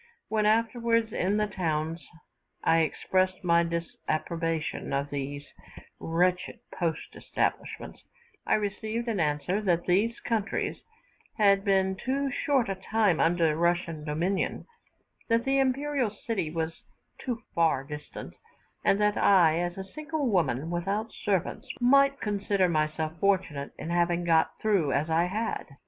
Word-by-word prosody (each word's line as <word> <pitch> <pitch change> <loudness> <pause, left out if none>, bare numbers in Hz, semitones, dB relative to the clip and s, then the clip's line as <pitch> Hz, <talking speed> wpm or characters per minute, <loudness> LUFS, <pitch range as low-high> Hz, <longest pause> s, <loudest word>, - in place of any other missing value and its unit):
When, 215 -1 +2
afterwards, 230 0 +1
in 195 +3 +1
the 210 - +2
towns 160 -5 -2 0.6
I 165 - +4
expressed 185 +4 0
my 170 -1 +4
disapprobation 165 -1 -3
of 140 +1 -1
these 145 0 -4 0.5
wretched 180 +2 0
post 165 -3 -3
establishments, - - -3 0.5
I - - +4
received 215 +3 -3
as 220 -4 -1
answer 155 +6 0
that 175 -4 +1
these 205 +6 +1
countries 225 -3 -2 0.6
had 200 -2 +4
been 190 -1 +2
too 270 +6 -1
short 270 -2 +1
a 195 - -1
time 190 -2 +1
under 165 0 +3
Russian 170 -1 0
dominion, 165 +6 -1 0.6
that 230 +1 +2
the 270 0 +2
imperial 270 -1 +1
city 205 -5 -3
was 160 0 -4 0.4
too 245 -2 -4
far 165 -5 +2
distant, 150 +1 -8 0.5
and 195 - +3
that 210 0 +2
I, 170 -5 +5
as 175 +1 -2
a 190 - -4
single 305 +8 -4
woman 160 - 0
without 195 +6 -2
servants, 205 +6 -2
might 275 +3 +4
consider 200 -2 +1
myself 155 0 -1
fortunate 180 -8 0
in 165 - -5
having 175 0 +1
got 165 -2 +2
through 195 -10 +2
as 150 +3 0
I 165 +2 +3
had. 215 +5 -3
185 Hz, 135 wpm, -28 LUFS, 165-215 Hz, 0.6 s, I